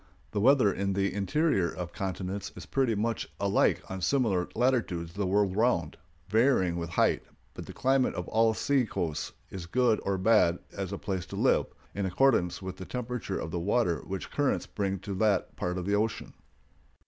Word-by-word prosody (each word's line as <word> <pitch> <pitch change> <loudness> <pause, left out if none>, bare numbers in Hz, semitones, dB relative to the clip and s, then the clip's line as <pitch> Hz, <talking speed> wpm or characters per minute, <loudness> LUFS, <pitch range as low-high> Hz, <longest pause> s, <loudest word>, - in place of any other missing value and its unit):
The 105 - -1
weather 125 -5 +5
in 100 0 -1
the 100 0 0
interior 100 - +1
of 90 -1 -6
continents 95 +1 -4
is - - -9
pretty 130 -5 +1
much 110 -4 -2
alike 100 0 +2
on 95 0 -6
similar 100 -5 +1
latitudes 110 -9 0
the 100 0 -1
world 100 0 +2
round, 105 -9 +1 0.3
varying 110 -5 +3
with 85 -1 -4
height; 85 - +2 0.3
but - - -8
the - - -8
climate 130 0 +2
of 90 - -4
all 110 0 +3
sea 140 +1 +2
coasts 80 -6 -3 0.2
is 90 -3 -7
good 120 +2 +2
or 100 -1 0
bad 95 -3 +4 0.2
as 95 -1 -4
a 100 - -3
place 95 -3 -3
to - - -7
live, - - +2 0.3
in 100 -1 -1
accordance 95 -4 +2
with 95 -1 -6
the 95 - -7
temperature 125 -4 -4
of 80 - -5
the 85 - -2
water 95 -1 +1
which 95 -1 -5
the - - -15
currents 145 -2 +1
bring 100 -2 -2
to 100 0 -5
that 100 -1 +1
part 90 +1 -2
of 90 - -3
the 100 - 0
ocean. 105 +1 -1
100 Hz, 190 wpm, -29 LUFS, 90-115 Hz, 0.3 s, weather